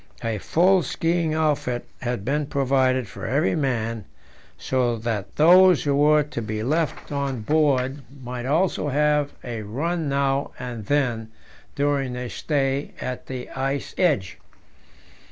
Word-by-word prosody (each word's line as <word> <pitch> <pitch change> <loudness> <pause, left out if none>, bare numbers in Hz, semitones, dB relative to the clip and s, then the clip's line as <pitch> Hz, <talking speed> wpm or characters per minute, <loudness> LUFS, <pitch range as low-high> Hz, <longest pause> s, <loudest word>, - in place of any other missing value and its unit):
A 115 -2 -1
full 180 - +3
skiing 165 +1 0
outfit 145 -6 0 0.2
had 120 -5 -3
been 145 +2 0
provided 130 -3 +1
for 115 - -7
every 140 +8 +1
man, 115 - -1 0.5
so 125 -2 0
that 110 -4 -4
those 180 +2 +6
who 145 - +1
were 150 +1 +4
to 145 -5 -5
be 110 0 -3
left 155 +6 -1
on 140 -4 -2
board 140 0 +1 0.2
might 125 0 -5
also 160 +1 +1
have 150 0 +2
a 115 -3 -5
run 150 +9 -2
now 140 0 0
and 120 -4 -6
then 120 -6 0 0.5
during 140 -2 0
their 125 0 -5
stay 140 -2 -1
at 125 -1 -5
the 130 -1 -5
ice 135 +1 -3
edge. 145 - +1
135 Hz, 135 wpm, -24 LUFS, 120-150 Hz, 0.5 s, those